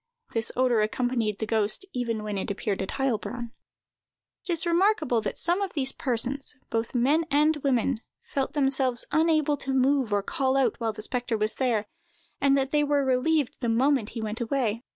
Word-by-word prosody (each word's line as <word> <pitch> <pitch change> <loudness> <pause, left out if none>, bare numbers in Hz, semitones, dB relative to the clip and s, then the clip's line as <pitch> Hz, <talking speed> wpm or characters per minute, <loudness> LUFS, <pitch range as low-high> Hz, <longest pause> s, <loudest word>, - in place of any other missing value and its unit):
This 225 0 0
odor 250 -3 +3
accompanied 225 -1 0
the 220 - -2
ghost 215 - 0
even 230 -3 -2
when 210 -1 -3
it 195 - -3
appeared 200 0 -2
at 190 - -4
Heilbronn. 245 -2 -2 1.0
It - - -1
is 335 +1 +3
remarkable 345 - +2
that - - -4
some 350 +4 0
of 390 -2 -2
these 270 -3 +2
persons, 260 +2 -2 0.2
both 225 +2 -2
men 280 +7 +3
and 300 +2 +3
women, 265 -4 0 0.2
felt 270 -1 -3
themselves 270 -4 +1
unable 310 -2 +2
to 270 -1 -3
move 265 -2 +2
or 205 -1 +1
call 265 +5 0
out 270 - +1
while 225 -2 0
the 215 0 -8
spectre 245 -1 -2
was 215 +1 +1
there, 235 -5 0 0.6
and 275 0 +4
that 270 0 0
they 295 -1 +3
were 285 -1 +1
relieved 265 +2 +1
the 240 - 0
moment 255 0 +2
he - - -2
went 215 +3 -4
away. 235 -2 -1
255 Hz, 185 wpm, -27 LUFS, 225-280 Hz, 1.0 s, and